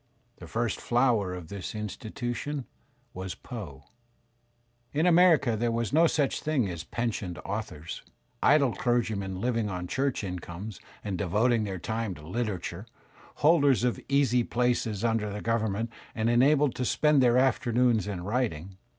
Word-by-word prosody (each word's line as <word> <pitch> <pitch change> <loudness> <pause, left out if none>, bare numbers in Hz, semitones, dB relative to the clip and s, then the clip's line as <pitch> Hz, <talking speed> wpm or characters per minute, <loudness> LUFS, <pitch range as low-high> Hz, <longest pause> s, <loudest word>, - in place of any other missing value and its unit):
The - - -10
first 115 0 -2
flower 120 -7 +2
of 85 -3 -9
this 100 +1 -6
institution 120 +6 -4 0.5
was 95 0 -5
Poe. 85 - -8 1.1
In 155 +4 +2
America 165 -8 +5
there 120 +2 0
was 115 +1 -1
no 165 +2 +6
such 145 -4 0
thing 145 -8 +1
as 85 -3 -5
pensioned 105 -3 -3
authors, 100 -7 -5 0.4
idle 140 -5 +4
clergymen 110 -6 -1
Uving 115 +1 -1
on 90 -2 -4
church 135 +5 -1
incomes 90 +2 -6 0.2
and 95 -4 -3
devoting 110 +5 +2
their 95 -2 -4
time 110 +1 -3
to 75 - -12
literature, 100 -1 -3 0.6
holders 145 -6 +5
of 125 -1 +1
easy 135 -4 +3
places 120 -4 0
under 115 -3 0
the 105 - -4
govern 110 -2 0
ment 115 +3 -3 0.2
and 115 +1 +1
enabled 135 +2 +4
to 125 - -1
spend 150 +3 +3
their 125 -1 +4
afternoons 120 -3 +2
in 95 -4 -4
writing. 100 -5 -2
115 Hz, 145 wpm, -28 LUFS, 100-125 Hz, 1.1 s, no